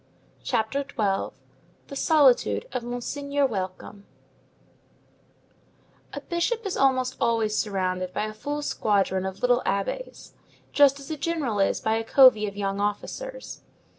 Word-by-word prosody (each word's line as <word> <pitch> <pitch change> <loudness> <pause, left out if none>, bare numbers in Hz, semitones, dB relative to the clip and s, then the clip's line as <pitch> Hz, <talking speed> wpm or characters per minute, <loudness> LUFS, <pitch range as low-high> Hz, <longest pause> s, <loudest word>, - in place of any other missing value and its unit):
CHAPTER 235 +2 0
XII—THE 220 +2 -5
SOLITUDE 260 - +3
OF 250 0 -2
MONSEIGNEUR 280 +4 -2
WELCOME 200 -2 -5 2.1
A - - -5
bishop 410 +7 -2
is 390 - -2
almost 260 -1 +2
always 225 -2 +1
surrounded 185 -3 -1
by - - -2
a 215 - -6
full 290 +7 -4
squadron 195 -6 0
of 190 +3 -8
little 245 0 +3
abbés, 200 - -3 0.4
just 285 -1 +5
as 280 +3 -9
a 310 - -3
general 290 -10 -2
is 195 - +1
by 220 0 +1
a 225 - -2
covey 225 -3 +6
of 200 0 -7
young 195 -1 -2
officers. - - -4
235 Hz, 130 wpm, -25 LUFS, 200-280 Hz, 2.1 s, covey